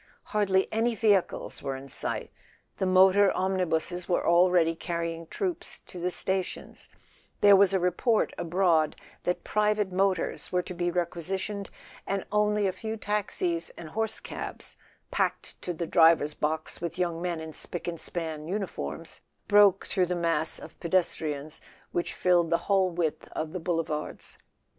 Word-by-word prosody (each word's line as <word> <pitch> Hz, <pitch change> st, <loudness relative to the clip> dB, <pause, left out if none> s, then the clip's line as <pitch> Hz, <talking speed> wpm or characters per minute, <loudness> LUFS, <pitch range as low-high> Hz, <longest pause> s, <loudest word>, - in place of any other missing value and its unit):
Hardly 195 Hz, -3 st, +1 dB
any 230 Hz, +1 st, +1 dB
vehicles 205 Hz, -4 st, +1 dB
were 135 Hz, -1 st, -3 dB
in 135 Hz, +1 st, -9 dB
sight: -, -, -2 dB, 0.5 s
the 190 Hz, -, 0 dB
motor 190 Hz, +2 st, +6 dB
omnibuses 180 Hz, -2 st, -1 dB
were 175 Hz, -, +1 dB
already 170 Hz, -1 st, +4 dB
carrying 165 Hz, 0 st, -4 dB
troops 355 Hz, -, -3 dB
to 180 Hz, -, -11 dB
the 180 Hz, +1 st, 0 dB
stations, 190 Hz, 0 st, -2 dB, 0.5 s
there 205 Hz, -1 st, +8 dB
was 195 Hz, -1 st, +5 dB
a 190 Hz, -, +2 dB
report 180 Hz, +6 st, +1 dB
abroad 170 Hz, -3 st, +2 dB, 0.3 s
that 180 Hz, -, -1 dB
private 210 Hz, -2 st, +1 dB
motors 190 Hz, -1 st, 0 dB
were 180 Hz, 0 st, +1 dB
to 180 Hz, -, -6 dB
be 175 Hz, 0 st, -1 dB
requisitioned, 185 Hz, +4 st, -2 dB, 0.4 s
and 195 Hz, 0 st, -1 dB
only 210 Hz, 0 st, +2 dB
a 190 Hz, -, +2 dB
few 220 Hz, +4 st, -5 dB
taxis 185 Hz, -5 st, -1 dB
and 165 Hz, -2 st, -8 dB
horse 220 Hz, +5 st, -1 dB
cabs, -, -, -7 dB, 0.4 s
packed -, -, -2 dB
to 180 Hz, -, -3 dB
the 170 Hz, 0 st, -3 dB
driver's 160 Hz, -3 st, +5 dB
box 155 Hz, +2 st, -2 dB
with 170 Hz, 0 st, -4 dB
young 170 Hz, -2 st, -1 dB
men 175 Hz, -2 st, -2 dB
in 160 Hz, 0 st, -7 dB
spick 175 Hz, -, -4 dB
and 170 Hz, -1 st, -3 dB
span 160 Hz, -3 st, -4 dB
uniforms, 180 Hz, -, -5 dB, 0.3 s
broke 205 Hz, -2 st, +5 dB
through 185 Hz, -2 st, +1 dB
the 180 Hz, -, -1 dB
mass 165 Hz, -2 st, 0 dB
of 160 Hz, -, -12 dB
pedes¬ 175 Hz, +1 st, +1 dB
trians 150 Hz, 0 st, -5 dB, 0.3 s
which 175 Hz, -, -2 dB
filled 175 Hz, -2 st, +3 dB
the 170 Hz, -, +3 dB
whole 195 Hz, -2 st, +3 dB
width 170 Hz, -3 st, -2 dB
of 155 Hz, 0 st, -4 dB
the 185 Hz, -, -3 dB
Boulevards. 165 Hz, -3 st, -3 dB
180 Hz, 155 wpm, -28 LUFS, 165-195 Hz, 0.5 s, there